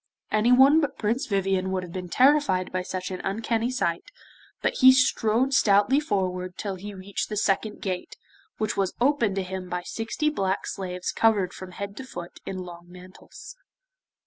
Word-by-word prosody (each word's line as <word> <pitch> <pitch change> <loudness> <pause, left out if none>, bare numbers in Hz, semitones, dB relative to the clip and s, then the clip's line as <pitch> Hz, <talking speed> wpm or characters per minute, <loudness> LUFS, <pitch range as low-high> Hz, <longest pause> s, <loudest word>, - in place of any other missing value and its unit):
Anyone 250 +8 +5
but 290 - -2
Prince 235 +7 -1
Vivien 195 -2 0
would 190 -1 -2
have 175 - -9
been 180 0 -6
terrified 255 - +3
by 185 - -1
such 185 +1 -5
an 185 - -5
uncanny 225 +4 -1
sight, 205 -10 -1 0.5
but - - -1
he 260 0 +9
strode 255 0 +2
stoutly 220 +1 +4
forward 185 - -2
till 200 -2 -3
he 200 +2 -8
reached 190 +1 -4
the 210 - -3
second 210 +1 0
gate, 185 -2 -4 0.4
which 215 -1 -1
was 195 -2 -1
opened 240 -6 +2
to 195 - -1
him 185 0 -6
by 180 0 -3
sixty 225 +10 -2
black 195 -8 -1
slaves 180 -2 -4
covered 210 -5 +2
from 185 -1 -9
head 200 +1 -6
to - - -6
foot 175 -9 -9
in 190 - -4
long 175 -1 -9
mantles. 185 - -13
200 Hz, 170 wpm, -26 LUFS, 185-235 Hz, 0.5 s, he